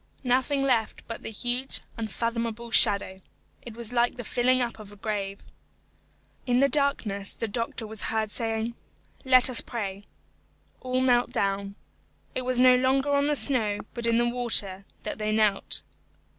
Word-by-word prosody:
Nothing 260 Hz, +2 st, +1 dB
left 240 Hz, -5 st, 0 dB
but 230 Hz, -, -7 dB
the -, -, -6 dB
huge, 245 Hz, +4 st, -2 dB
unfathomable 230 Hz, +1 st, -4 dB
shadow. 200 Hz, -4 st, +4 dB, 0.4 s
It 235 Hz, -2 st, -10 dB
was 235 Hz, 0 st, -2 dB
like 240 Hz, 0 st, +1 dB
the 245 Hz, -, -6 dB
filling 250 Hz, +3 st, +1 dB
up 235 Hz, -2 st, -3 dB
of 210 Hz, -2 st, -11 dB
the 205 Hz, -, -14 dB
grave. 200 Hz, -1 st, -4 dB, 1.1 s
In 245 Hz, 0 st, +2 dB
the 275 Hz, -, +5 dB
darkness 260 Hz, -9 st, +1 dB
the 225 Hz, -, -4 dB
doctor 230 Hz, +1 st, -3 dB
was 220 Hz, -1 st, -8 dB
heard 220 Hz, -1 st, -1 dB
saying, 225 Hz, +1 st, -3 dB, 0.5 s
"Let 255 Hz, -1 st, +6 dB
us 255 Hz, -3 st, +5 dB
pray." 200 Hz, -3 st, -6 dB, 0.7 s
All 255 Hz, 0 st, -2 dB
knelt 245 Hz, -2 st, +3 dB
down. 200 Hz, -4 st, -2 dB, 0.6 s
It -, -, -2 dB
was 255 Hz, -1 st, +1 dB
no 255 Hz, 0 st, +7 dB
longer 265 Hz, +2 st, +1 dB
on 280 Hz, 0 st, +2 dB
the 295 Hz, -, +1 dB
snow, 225 Hz, -8 st, 0 dB
but 235 Hz, -1 st, -3 dB
in 230 Hz, 0 st, +2 dB
the 240 Hz, 0 st, +2 dB
water, 220 Hz, -6 st, +3 dB, 0.2 s
that -, -, -5 dB
they 215 Hz, 0 st, -1 dB
knelt. 215 Hz, -2 st, 0 dB
235 Hz, 160 wpm, -26 LUFS, 215-255 Hz, 1.1 s, no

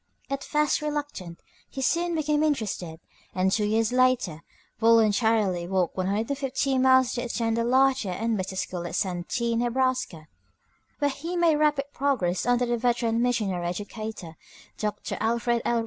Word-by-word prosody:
At 275 Hz, 0 st, -2 dB
first 300 Hz, -1 st, +1 dB
reluctant, 290 Hz, -, -4 dB, 0.3 s
he 265 Hz, -, -5 dB
soon 340 Hz, +5 st, +1 dB
became 300 Hz, -1 st, +1 dB
interested, 215 Hz, -, -2 dB, 0.4 s
and 185 Hz, 0 st, +2 dB
two 210 Hz, +1 st, +1 dB
years 220 Hz, +2 st, +1 dB
later 250 Hz, -11 st, +2 dB, 0.4 s
voluntarily 220 Hz, -5 st, +3 dB
walked 185 Hz, -2 st, 0 dB
150 260 Hz, +8 st, -1 dB
miles 260 Hz, -1 st, +4 dB
to 240 Hz, -, -2 dB
attend 230 Hz, -1 st, -1 dB
a -, -, +1 dB
larger 260 Hz, -3 st, +3 dB
and 225 Hz, +5 st, -1 dB
better 190 Hz, -1 st, -4 dB
school 175 Hz, -2 st, -3 dB
at 170 Hz, -, -5 dB
Santee, 190 Hz, +6 st, -1 dB
Neb., 240 Hz, +2 st, -1 dB
where 255 Hz, -, -4 dB
he 335 Hz, +6 st, -5 dB
made 335 Hz, -3 st, +3 dB
rapid 295 Hz, -2 st, +2 dB
progress 245 Hz, -10 st, 0 dB
under 245 Hz, 0 st, +3 dB
the 240 Hz, 0 st, 0 dB
veteran 235 Hz, -1 st, +1 dB
missionary 210 Hz, -8 st, 0 dB
educator, 205 Hz, -2 st, -6 dB, 0.4 s
Dr. 210 Hz, -1 st, -3 dB
Alfred 235 Hz, +1 st, +1 dB
L. 240 Hz, -1 st, +2 dB
235 Hz, 145 wpm, -26 LUFS, 195-265 Hz, 0.4 s, miles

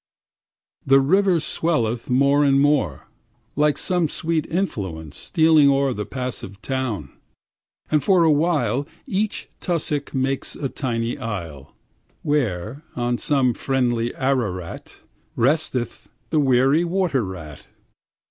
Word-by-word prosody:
The 135 Hz, 0 st, +5 dB
river 185 Hz, +5 st, +3 dB
swelleth 125 Hz, -8 st, -1 dB
more 140 Hz, +3 st, +4 dB
and 135 Hz, -1 st, +4 dB
more, 140 Hz, -, +1 dB, 0.5 s
Like 150 Hz, 0 st, +2 dB
some 175 Hz, -4 st, 0 dB
sweet 160 Hz, 0 st, -1 dB
influence 95 Hz, -, -3 dB
stealing 160 Hz, -4 st, +4 dB
o'er 135 Hz, -1 st, +2 dB
The 105 Hz, -3 st, -5 dB
passive 125 Hz, -5 st, -5 dB
town; 120 Hz, -, -3 dB, 0.8 s
and 150 Hz, -2 st, +2 dB
for 185 Hz, -4 st, +4 dB
a 160 Hz, -, +5 dB
while 145 Hz, -4 st, +1 dB, 0.2 s
Each 215 Hz, -3 st, -2 dB
tussuck 150 Hz, -5 st, -2 dB
makes 135 Hz, +1 st, -1 dB
a 135 Hz, -, -3 dB
tiny 120 Hz, -1 st, -2 dB
isle, 85 Hz, -, -6 dB, 0.5 s
Where, 120 Hz, -3 st, -1 dB
on 120 Hz, 0 st, -1 dB
some 135 Hz, -5 st, +2 dB
friendly 120 Hz, -3 st, 0 dB
Ararat, 115 Hz, -11 st, -3 dB, 0.3 s
Resteth 130 Hz, -1 st, 0 dB, 0.2 s
the 155 Hz, -, +3 dB
weary 135 Hz, +3 st, +3 dB
water 175 Hz, -7 st, 0 dB
rat. 85 Hz, -6 st, -8 dB
135 Hz, 115 wpm, -22 LUFS, 115-155 Hz, 0.8 s, The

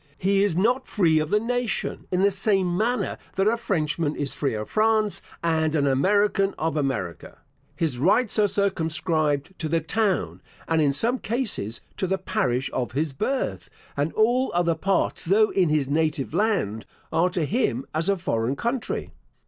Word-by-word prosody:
He 195 Hz, +1 st, +2 dB
is 200 Hz, -5 st, +1 dB
not 245 Hz, +7 st, +1 dB
free 165 Hz, -6 st, +3 dB
of 155 Hz, 0 st, -2 dB
the 210 Hz, -, +3 dB
nation, 245 Hz, 0 st, -2 dB
in 185 Hz, +1 st, +1 dB
the 200 Hz, -, +4 dB
same 195 Hz, -2 st, +2 dB
manner 235 Hz, +6 st, -1 dB, 0.2 s
that 195 Hz, -, +1 dB
a 225 Hz, -, +3 dB
Frenchman 160 Hz, -8 st, -1 dB
is 145 Hz, -2 st, -3 dB
free 140 Hz, -6 st, -1 dB
of 105 Hz, 0 st, -4 dB
France, 215 Hz, -1 st, +1 dB, 0.2 s
and 160 Hz, -1 st, +1 dB
an 145 Hz, -2 st, +2 dB
American 195 Hz, +8 st, +2 dB
of 160 Hz, -1 st, -1 dB
America. 135 Hz, -, -3 dB, 0.4 s
His 150 Hz, -7 st, -2 dB
rights 210 Hz, -, +3 dB
are 210 Hz, -, +5 dB
circumscribed 160 Hz, -5 st, 0 dB
to 160 Hz, -, -3 dB
the 165 Hz, +1 st, +2 dB
town, 195 Hz, +4 st, -1 dB, 0.3 s
and, 165 Hz, -1 st, +2 dB
in 145 Hz, -2 st, +3 dB
some 235 Hz, -, +2 dB
cases, 215 Hz, -, -3 dB, 0.2 s
to 190 Hz, -, -1 dB
the 190 Hz, +1 st, 0 dB
parish 135 Hz, -, -1 dB
of 125 Hz, -2 st, -2 dB
his 150 Hz, +1 st, -1 dB
birth; 265 Hz, -, -2 dB, 0.3 s
and 145 Hz, +3 st, 0 dB
all 245 Hz, +4 st, +2 dB
other 175 Hz, -1 st, +2 dB
parts, 190 Hz, +5 st, 0 dB
though 205 Hz, +5 st, +3 dB
in 180 Hz, -4 st, +2 dB
his 150 Hz, -3 st, +1 dB
native 150 Hz, -1 st, 0 dB
land, 175 Hz, -, 0 dB, 0.3 s
are 175 Hz, +2 st, +3 dB
to 175 Hz, -3 st, -1 dB
him 140 Hz, -, 0 dB
as 160 Hz, +4 st, -1 dB
a 200 Hz, -, +2 dB
foreign 125 Hz, -7 st, -1 dB
country. 235 Hz, -, -3 dB
175 Hz, 175 wpm, -24 LUFS, 150-210 Hz, 0.4 s, are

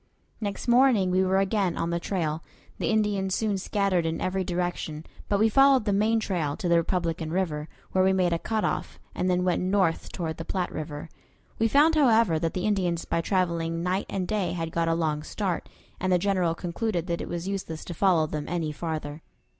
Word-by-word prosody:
Next 205 Hz, +2 st, -4 dB
morning 240 Hz, -6 st, +4 dB
we 185 Hz, +1 st, +3 dB
were 190 Hz, 0 st, +2 dB
again 195 Hz, -2 st, +1 dB
on 170 Hz, 0 st, -1 dB
the 170 Hz, -, 0 dB
trail. 165 Hz, -4 st, -2 dB, 0.4 s
The -, -, 0 dB
Indians 205 Hz, -4 st, +1 dB
soon 210 Hz, -3 st, 0 dB
scattered 195 Hz, -3 st, +1 dB
in 165 Hz, 0 st, -2 dB
every 190 Hz, +1 st, -1 dB
direction, 175 Hz, -3 st, -3 dB, 0.2 s
but 200 Hz, -, +2 dB
we 220 Hz, -, +5 dB
followed 270 Hz, 0 st, +5 dB
the 205 Hz, -, +1 dB
main 220 Hz, +3 st, +2 dB
trail 170 Hz, -9 st, -2 dB
to 180 Hz, -, -3 dB
the 170 Hz, 0 st, +4 dB
Republican 165 Hz, -2 st, -1 dB
River, 160 Hz, -4 st, -2 dB, 0.2 s
where 185 Hz, -, +3 dB
we 190 Hz, -, +4 dB
made 180 Hz, -2 st, +2 dB
a 165 Hz, -, 0 dB
cut 220 Hz, +3 st, -1 dB
off, -, -, -3 dB, 0.2 s
and 185 Hz, -, -1 dB
then 180 Hz, 0 st, +2 dB
went 180 Hz, -1 st, +1 dB
north 185 Hz, -3 st, +1 dB
toward 160 Hz, -3 st, -4 dB
the 165 Hz, -, -5 dB
Platte 180 Hz, +1 st, -2 dB
River. 150 Hz, 0 st, -6 dB, 0.5 s
We 225 Hz, -, +4 dB
found, 295 Hz, +7 st, +5 dB
however, 230 Hz, -, +4 dB
that 165 Hz, 0 st, -2 dB
the 185 Hz, +1 st, -1 dB
Indians 180 Hz, -5 st, 0 dB
by 165 Hz, -, 0 dB
traveling 170 Hz, -2 st, 0 dB
night 185 Hz, +2 st, -1 dB
and 185 Hz, -2 st, -2 dB
day 200 Hz, -5 st, -1 dB
had 165 Hz, -2 st, -3 dB
got 165 Hz, 0 st, 0 dB
a 165 Hz, -, +2 dB
long 155 Hz, -2 st, 0 dB
start, 185 Hz, +2 st, -3 dB, 0.3 s
and 185 Hz, 0 st, 0 dB
the 180 Hz, -, +5 dB
General 180 Hz, -3 st, +1 dB
concluded 175 Hz, +1 st, -2 dB
that 170 Hz, -2 st, -2 dB
it -, -, -6 dB
was 175 Hz, +1 st, -4 dB
useless 185 Hz, -5 st, -4 dB
to 175 Hz, -, -5 dB
follow 170 Hz, -2 st, +3 dB
them 150 Hz, -1 st, -4 dB
any 165 Hz, -3 st, -1 dB
farther. 155 Hz, -1 st, -5 dB
180 Hz, 210 wpm, -27 LUFS, 165-200 Hz, 0.5 s, we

